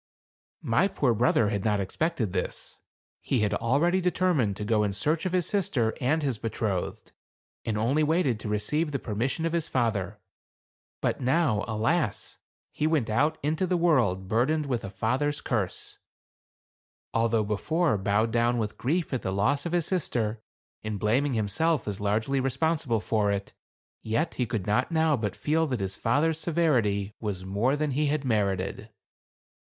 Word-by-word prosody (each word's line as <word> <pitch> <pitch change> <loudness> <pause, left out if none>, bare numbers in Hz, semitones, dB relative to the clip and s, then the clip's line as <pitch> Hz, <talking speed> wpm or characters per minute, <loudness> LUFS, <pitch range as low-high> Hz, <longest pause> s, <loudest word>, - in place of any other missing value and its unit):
My 115 +12 +3
poor 135 -10 +1
brother 115 -1 +3
had 100 -3 -2
not 105 -2 +1
expected 115 - -1
this. - - -4 0.4
He 125 - 0
had 105 -1 +1
already 145 - +2
determined 175 - +1
to 105 - -4
go 110 0 +2
in 100 -1 -1
search 155 - 0
of - - -3
his 180 -2 +1
sister 180 - 0
and 150 +5 +1
his 130 -6 -1
betrothed, 110 -4 -3 0.5
and 110 -2 -1
only 125 +8 +2
waited 150 -7 +2
to 105 - -5
re 105 - +1
ceive 150 +9 0
the - - +1
permission 125 +7 -2
of 165 - -1
his 170 -2 0
father. 105 -5 -1 0.8
But - - -1
now, 130 -5 +2
alas! 115 - -1 0.3
he 150 - 0
went 145 -9 +1
out 150 +8 +2
into 155 +5 0
the 180 0 +1
world 120 - +2
burdened 135 +9 +1
with 125 -4 -1
162 125 +10 -1
THE - - -7
CARAVAN. 110 -6 +2
a - - -14
father's - - -13
curse. - - -10 1.2
Although 115 -1 +2
before 150 - +1
bowed 105 +3 +1
down 120 +1 +2
with 105 -3 -3
grief 160 +5 -1
at 130 - -1
the 95 - -2
loss 135 - +1
of - - -5
his 175 -3 +2
sister, 115 - -1 0.4
and 110 -2 -3
blaming 125 +6 +1
himself 115 +7 0
as 100 -1 -4
largely 110 +7 0
responsible 135 -3 0
for 105 -2 +1
it, 100 0 -3 0.5
yet 150 +10 -1
he 125 - -1
could 110 -5 -3
not 125 +9 +1
now 160 -2 +3
but 110 -5 -3
feel 160 +2 +1
that 125 -5 -2
his 95 -1 -3
father's 150 +9 +1
severity 120 - +1
was 100 -4 -4
more 105 +8 +1
than 150 0 -1
he 150 +3 +1
had 145 -1 -1
merited. 100 -2 -1
120 Hz, 175 wpm, -27 LUFS, 105-155 Hz, 1.2 s, My